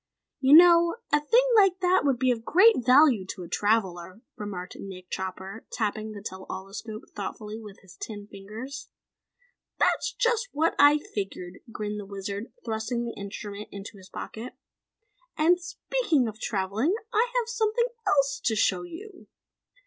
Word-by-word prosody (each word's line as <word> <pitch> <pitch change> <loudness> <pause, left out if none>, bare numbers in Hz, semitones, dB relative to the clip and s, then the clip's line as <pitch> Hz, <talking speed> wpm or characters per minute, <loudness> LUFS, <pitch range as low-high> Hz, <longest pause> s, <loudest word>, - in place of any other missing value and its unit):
"You 270 +2 +6
know, 340 0 +7 0.2
a 295 - +6
thing 465 +12 +3
like 390 -3 +5
that 365 0 +3
would 275 -3 +2
be 255 +1 +2
of 225 -2 -2
great 370 - +5
value 255 -3 +6
to 185 - -6
a - - -8
traveller," 190 -1 -1
remarked 190 -4 -6
Nick 185 -2 -9
Chopper, 190 +3 -6
tapping 215 0 -2
the 205 -1 -9
tell 190 -2 -7
all 190 +1 -6
escope 215 +2 -8
thoughtfully 210 +1 -6
with 210 -3 -12
his 190 - -17
tin 205 -2 -7
fingers. 215 +8 -9 0.9
"That's - - +2
just 475 0 0
what 320 +3 +2
I 290 +1 +7
figured," 195 -8 -6
grinned 210 -1 -4
the 200 - -8
Wizard, 200 +2 -6
thrusting 225 +1 -2
the 235 - -5
instrument 200 +1 -7
into 200 +1 -9
his 190 -1 -15
pocket. 230 +3 -7 0.8
"And, 345 +3 +4
speaking 345 - 0
of 220 0 -7
travelling, 215 - 0 0.2
I 450 +3 +3
have 485 -2 +1
something 470 +1 0 0.2
else 275 -6 +2
to 225 - +1
show 185 -3 +2
you!" 360 - -10
225 Hz, 155 wpm, -27 LUFS, 200-320 Hz, 0.9 s, know